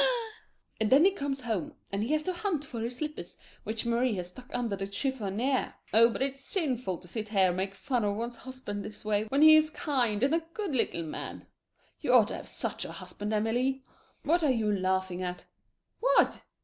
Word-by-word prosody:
And 220 -1 +1
then 285 +6 +7
he 390 - +6
comes 280 -7 -3
home 220 -9 -3 0.2
and 205 +4 -1
has 305 0 +1
to 370 - -1
hunt 350 -6 -2
for 240 -4 -6
his 235 +2 -3
slippers 300 - -5 0.3
which 220 +2 -2
Marie 235 0 +1
has 180 -2 -3
stuck 250 +7 -12
under 235 -4 -1
the 195 0 -4
chiffonier 245 +3 -1 0.2
oh, 230 +2 +7
but 235 - -1
it's 275 0 -3
sinful 255 - +1
to 180 - -15
sit 215 +3 -5
here 195 -3 +4
and 175 - -2
make 190 +1 -2
fun 245 +2 -1
of 205 -1 0
one's 235 +2 -4
husband 255 -6 -6
this 210 0 -8
way 210 0 +1
when 275 +7 +2
he 315 0 +10
is 310 0 +5
kind 245 -8 0
and 280 +3 +3
a 330 0 +2
good 405 -8 -2
little 200 -9 0
man. 155 - -6 0.5
You - - +1
ought - - +6
to - - -4
have - - -9
had - - -9
such - - -3
a - - -7
husband, 205 +1 -6
Amelie. 245 +5 0 0.4
What 335 +3 +2
are 300 - +4
you 225 -5 +2
laughing 185 -2 0
at? 180 -1 -4 0.5
What? - - +3
235 Hz, 210 wpm, -29 LUFS, 205-275 Hz, 0.5 s, he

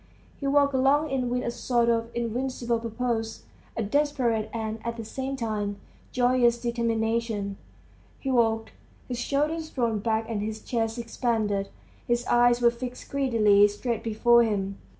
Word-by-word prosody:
He 280 - -2
walked 280 0 +3
along 275 +3 +3
it 270 -1 0
with 245 +1 -1
a - - -1
sort 240 -1 +1
of 230 0 +1
invincible 240 0 -1
purpose, 225 -1 -3 0.3
a 225 - 0
desperate 235 -3 0
and 220 -1 -4
at 235 0 -4
the 225 - -6
same 265 +4 -4
time 210 -4 -2 0.3
joyous 245 -1 +3
determination. 230 -3 -1 0.6
He 270 - -2
walked, 225 -3 +2 0.4
his 245 -2 -4
shoulders 305 +5 -1
thrown 230 -4 0
back 220 +1 0
and 220 -3 -2
his 215 +1 -4
chest 225 -1 -1
expanded; 220 -4 -1 0.4
his 240 0 +1
eyes 240 0 +4
were 235 0 +5
fixed 245 +1 -8
greedily 220 -7 +4
straight 225 +2 -3
before 235 +2 +4
him. 200 -3 -1
235 Hz, 150 wpm, -26 LUFS, 220-250 Hz, 0.6 s, were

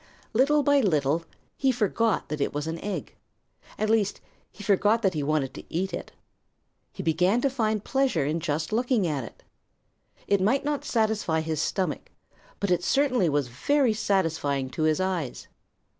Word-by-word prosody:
Little 285 +5 +3
by 285 0 +4
little 160 - +1 0.3
he 270 -1 +3
forgot 225 -2 0
that 150 -1 -3
it 140 - -1
was 145 0 -2
an 165 +1 -4
egg. 205 -1 -4 0.6
At 215 - 0
least, 215 -2 +1 0.3
he 205 - -11
forgot 210 +3 +3
that 190 -2 +3
he 155 - -2
wanted 145 -2 0
to - - -9
eat 185 +2 -2
it. - - -5 0.8
He - - -7
began 180 +7 +2
to 275 - +1
find 220 -5 0
pleasure 265 - +1
in 155 +4 -1
just 155 +3 -2
looking 240 -3 +2
at 145 -6 -1
it. 115 - -12 0.8
It 200 -1 +2
might 265 +9 +2
not 295 -1 -1
satisfy 215 -8 +1
his 160 -1 -2
stomach, 190 +1 -2 0.5
but 200 -2 -1
it 175 0 +2
certainly 255 - +2
was 145 -3 0
very 260 - +2
satisfying 160 -10 0
to 160 - -4
his 155 -1 +2
eyes. 185 -8 -2
190 Hz, 170 wpm, -26 LUFS, 155-225 Hz, 0.8 s, by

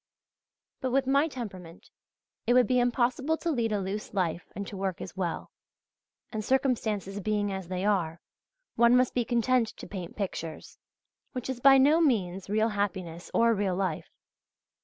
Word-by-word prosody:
But 260 - -1
with 270 +1 +2
my 280 +4 +3
temperament 190 - -8 0.6
it 245 - +4
would 250 -1 +6
be 255 -1 +2
impossible 250 +5 +1
to 335 - -2
lead 235 -6 0
a 210 - +1
loose 200 +2 -5
life 175 -2 -1
and 200 +2 -4
to 200 - -8
work 190 -2 -2
as 185 - -8
well, 175 -3 -3 0.8
and 220 -2 -3
circumstances 220 -6 0
being 205 0 0
as 190 -2 -5
they 185 +1 -3
are, 170 -6 +1 0.5
one 235 +1 +5
must 255 0 +2
be 245 - +1
content 240 +1 +2
to - - -8
paint 185 -4 -7
pictures, 165 -6 -5 0.5
which 255 0 -3
is 255 - -6
by 270 +1 +7
no 295 +5 +5
means 195 - 0
real 215 +2 +2
happiness 190 -5 -3
or 230 0 +4
real 200 -3 0
life. 185 -4 -2
210 Hz, 165 wpm, -28 LUFS, 190-250 Hz, 0.8 s, by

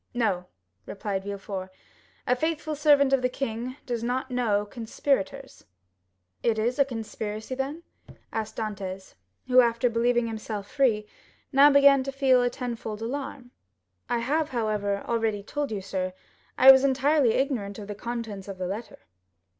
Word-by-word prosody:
"No," 190 -7 0 0.4
replied 195 -1 -4
Villefort; 195 -2 -5 0.6
"a 250 - +3
faithful 315 +2 -2
servant 290 -2 +4
of 270 - +4
the 250 - +1
king 250 -1 -4
does 240 -3 -3
not 255 +2 -2
know 220 -5 +1
conspirators." 250 +3 -3 0.8
0103m - - +3
"It 220 - +1
is 240 +5 0
a 280 - +6
conspiracy, 220 -2 -5
then?" 275 +5 -4 0.5
asked 220 -1 -3
Dantès, 195 -3 -5 0.3
who 255 0 +6
after 235 0 +1
believing 240 +1 +2
himself 215 -2 -5
free, 235 -7 +2 0.5
now 280 +1 +7
began 280 -1 +6
to 275 +1 -4
feel 265 -2 +4
a 245 - +2
tenfold 230 -4 -5
alarm. 260 0 -5 0.6
"I 240 - +1
have, 295 +6 0
however, 210 -5 -1
already 225 -3 0
told 290 +5 -3
you, 205 -2 -3
sir, 185 -1 -3 0.4
I 265 +1 +10
was 265 0 +6
entirely 275 -2 +3
ignorant 240 -8 -1
of 205 -2 -8
the 210 - -4
contents 220 -3 -5
of 195 -1 -7
the 185 - -3
letter." 205 +6 -6
235 Hz, 155 wpm, -26 LUFS, 210-270 Hz, 0.8 s, I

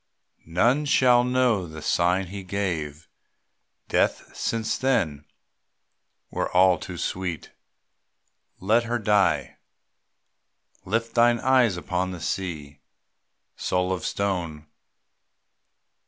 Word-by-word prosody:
None 120 - +2
shall 125 -3 +4
know 125 -7 +1
the 80 0 -9
sign 90 +4 +1
he 100 - -5
gave. 85 -6 -4 0.8
Death - - 0
since 115 -1 -1
then, 95 - 0 1.1
were - - -2
all 90 0 +5
too 90 -2 -7
sweet. 90 -2 -4 1.1
Let 110 +5 +2
her 120 +1 -1
die. 105 -4 +1 1.3
Lift 115 +4 -1
thine 120 0 +4
eyes 125 -7 +3
upon 90 +1 -2
the 90 -2 -7
sea, 80 -6 -4 0.8
Soul 90 0 -1
of 90 -4 -5
stone. 85 -7 -2
95 Hz, 95 wpm, -25 LUFS, 85-115 Hz, 1.3 s, all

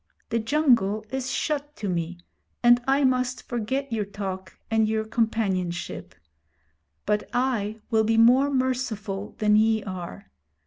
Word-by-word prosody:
The 230 - 0
jungle 225 -5 +2
is 260 -1 -3
shut 295 +2 -2
to 210 - -5
me, 175 -1 -2 0.5
and 240 0 +6
I 275 +1 +3
must 255 -1 +1
forget 245 +3 -2
your 215 -2 0
talk 190 -2 -6
and 220 -1 +3
your 220 0 -1
companionship; 200 -6 -2 0.9
but 210 0 0
I 225 -4 -1
will 220 -1 +4
be 225 +1 +1
more 250 +5 +6
merciful 245 -7 -2
than 210 -1 +3
ye 220 0 +3
are. 185 -3 -7
220 Hz, 135 wpm, -25 LUFS, 205-255 Hz, 0.9 s, and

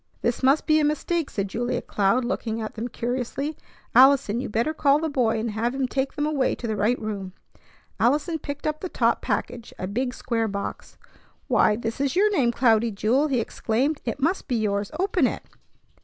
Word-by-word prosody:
"This 235 - 0
must 270 +3 +3
be 310 0 +4
a - - +2
mistake," 305 +2 0
said 200 -1 -2
Julia 240 +5 -2
Cloud, 210 +5 +1
looking 230 -3 -2
at 220 -1 -5
them 230 +2 -4
curiously. 250 +5 -3 0.4
"Allison, 260 -3 +5
you 255 - -4
better 230 +9 0
call 285 -2 +3
the 320 +1 -2
boy 235 -5 +1
and 225 0 -2
have 230 +4 -1
him 270 -1 0
take 265 +1 -2
them 295 - -1
away 295 -4 +1
to - - -8
the 220 -2 -1
right 210 +5 +1
room." 200 -4 -5 0.7
Allison 300 +7 +1
picked 285 0 -6
up 305 0 -1
the 370 - -5
top - - +1
package, 235 -2 -3
a - - -4
big, 245 +6 -2
square 230 -3 -1
box. 200 -1 -6 0.5
"Why, 210 - +4
this 225 +3 -4
is 280 +1 0
your 415 +3 +4
name, 265 -12 +2
Cloudy 230 -2 +3
Jewel!" 225 +8 +1
he 265 -4 +1
exclaimed. 250 +6 -1
"It 235 +3 -3
must 330 +7 0
be 255 - 0
yours. 205 -2 0
Open 370 -7 +2
it!" - - -5
245 Hz, 200 wpm, -25 LUFS, 225-285 Hz, 0.7 s, Allison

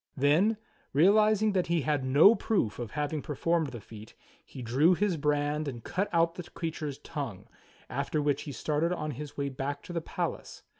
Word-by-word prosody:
Then, 160 +11 +3 0.4
realizing 210 +7 +4
that 185 -3 0
he 170 -1 +1
had 145 -1 0
no 145 +11 +7
proof 195 - -1
of 120 -3 -4
having 150 0 -1
performed 160 +3 0
the 120 -3 -7
feat, 110 +1 -12 0.3
he 130 - -9
drew 140 +10 +4
his 200 -1 +1
brand 150 0 0
and 120 -4 -6
cut 200 +3 -2
out 165 -1 +2
the 180 - -7
creature's 155 -4 -4
tongue, - - -6 0.4
after 140 +4 -2
which 145 -1 +1
he 145 - -6
started 155 +4 -1
on 155 -4 -2
his 145 +2 -8
way 140 -1 -1
back 140 +2 -4
to 175 - -8
the 170 - -1
palace. - - -5
150 Hz, 185 wpm, -29 LUFS, 140-170 Hz, 0.4 s, no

